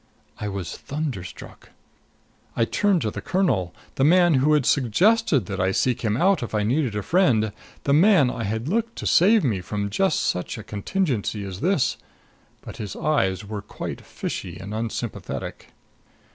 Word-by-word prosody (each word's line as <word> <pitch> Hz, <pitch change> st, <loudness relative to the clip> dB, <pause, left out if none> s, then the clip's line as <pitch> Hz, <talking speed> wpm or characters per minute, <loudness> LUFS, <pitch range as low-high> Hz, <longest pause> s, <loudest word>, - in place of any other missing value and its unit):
I 105 Hz, -, -3 dB
was 95 Hz, -4 st, -4 dB
thunderstruck. 135 Hz, -, -6 dB, 0.9 s
I 115 Hz, -, +2 dB
turned 200 Hz, -, +1 dB
to 110 Hz, -, -1 dB
the 100 Hz, -, -6 dB
colonel, 120 Hz, -, 0 dB, 0.3 s
the 135 Hz, -, +2 dB
man 175 Hz, +3 st, +5 dB
who 140 Hz, +3 st, +3 dB
had 150 Hz, -4 st, +3 dB
suggested 145 Hz, -, +3 dB
that -, -, -5 dB
I 95 Hz, +1 st, +2 dB
seek 125 Hz, +5 st, 0 dB
him 110 Hz, -1 st, 0 dB
out 190 Hz, +6 st, +3 dB
if 115 Hz, -2 st, -4 dB
I 105 Hz, -, +1 dB
needed 125 Hz, 0 st, 0 dB
a 105 Hz, -, -2 dB
friend 120 Hz, -, +2 dB, 0.3 s
the 140 Hz, -, +2 dB
man 160 Hz, -5 st, +5 dB
I 115 Hz, -, -4 dB
had 110 Hz, +5 st, -3 dB
looked 230 Hz, +6 st, -1 dB
to -, -, -6 dB
to -, -, +2 dB
save 205 Hz, +5 st, +5 dB
me 110 Hz, -9 st, 0 dB
from 100 Hz, +3 st, -3 dB
just 190 Hz, -, +1 dB
such 90 Hz, -, -2 dB
a 110 Hz, -, -7 dB
contingency 110 Hz, -, -2 dB
as 95 Hz, -2 st, -6 dB
this. 170 Hz, -, +1 dB, 0.6 s
But -, -, -10 dB
his 105 Hz, -3 st, -6 dB
eyes 95 Hz, -, 0 dB
were 105 Hz, 0 st, -5 dB
quite -, -, -7 dB
fishy -, -, -6 dB
and 100 Hz, +2 st, -7 dB
unsympathetic. 115 Hz, +1 st, -5 dB
120 Hz, 175 wpm, -24 LUFS, 105-170 Hz, 0.9 s, man